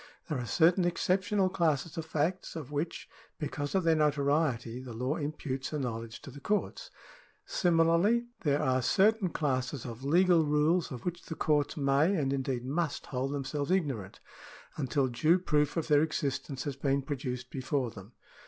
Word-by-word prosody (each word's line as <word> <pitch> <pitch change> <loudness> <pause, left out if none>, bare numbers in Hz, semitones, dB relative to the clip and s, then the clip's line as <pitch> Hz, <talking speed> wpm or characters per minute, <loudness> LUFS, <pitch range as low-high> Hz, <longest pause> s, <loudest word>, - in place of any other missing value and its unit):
There 150 -4 -1
are 120 - -4
certain 175 - +4
excep 180 +2 +1
tional 190 -1 +1
classes 155 -2 0
of 160 -1 -5
facts, 165 +4 -1
of 150 -4 -6
which, 150 +3 -3 0.3
because 145 +1 -4
of 190 - +2
their 165 -1 +4
notoriety, 140 -5 +1
the 130 -2 -8
law 125 +6 -1
imputes 145 -2 -4
a - - 0
knowledge 115 -4 -5
to 140 - -9
the 140 - -10
courts. 210 - -2 0.6
Similarly 175 +7 +3
there 145 -3 +1
§11] - - -4
CIVIL - - 0
LAW - - +1
29 130 - +3
are - - 0
certain 195 - +3
classes 130 -4 -2
of 120 +1 -7
legal 170 +3 +4
rules 150 +4 +2
of 125 -3 -7
which 175 -1 -4
the 160 - -5
courts 150 -1 +1
may, 145 +6 +3
and 140 -5 0
indeed 130 -2 -2
must, 150 +2 -2
hold 130 +1 -2
themselves 145 0 -3
ignorant, 140 - -1 0.6
until 140 -1 0
due 155 +8 +3
proof 150 -4 +1
of 165 - -1
their 150 -2 +5
existence 140 -3 -2
has 145 -2 -3
been 140 0 0
produced 125 -3 -4
before 130 -2 -1
them. 105 +1 -12
145 Hz, 180 wpm, -30 LUFS, 130-165 Hz, 0.6 s, their